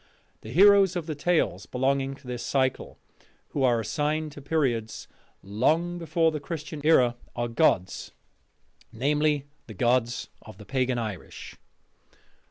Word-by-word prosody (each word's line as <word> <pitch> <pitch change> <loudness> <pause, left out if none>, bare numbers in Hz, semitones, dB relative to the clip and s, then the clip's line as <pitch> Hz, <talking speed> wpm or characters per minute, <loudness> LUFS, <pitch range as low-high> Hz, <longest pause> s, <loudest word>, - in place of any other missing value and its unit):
The 110 - -10
heroes 195 - +6
of 175 -3 -3
the 155 - -3
tales 145 - 0
belonging 135 +1 0
to 135 - -20
this 125 -1 -5
cycle, 130 -2 -1 0.5
who 145 - -3
are 120 -3 +3
assigned 150 +6 -1
to 145 - -11
periods 130 -7 -1 0.4
long 160 - 0
before 165 -1 +1
the 155 - -4
Christian 150 0 -6
era, 125 -6 +4 0.2
are 120 0 -1
gods, 95 -5 +1 0.8
namely, 145 +3 +1 0.2
the 110 - -10
gods 120 +2 0
of - - -13
the 105 - -12
pagan 130 +1 0
Irish. 110 -6 -6
135 Hz, 135 wpm, -26 LUFS, 120-155 Hz, 0.8 s, heroes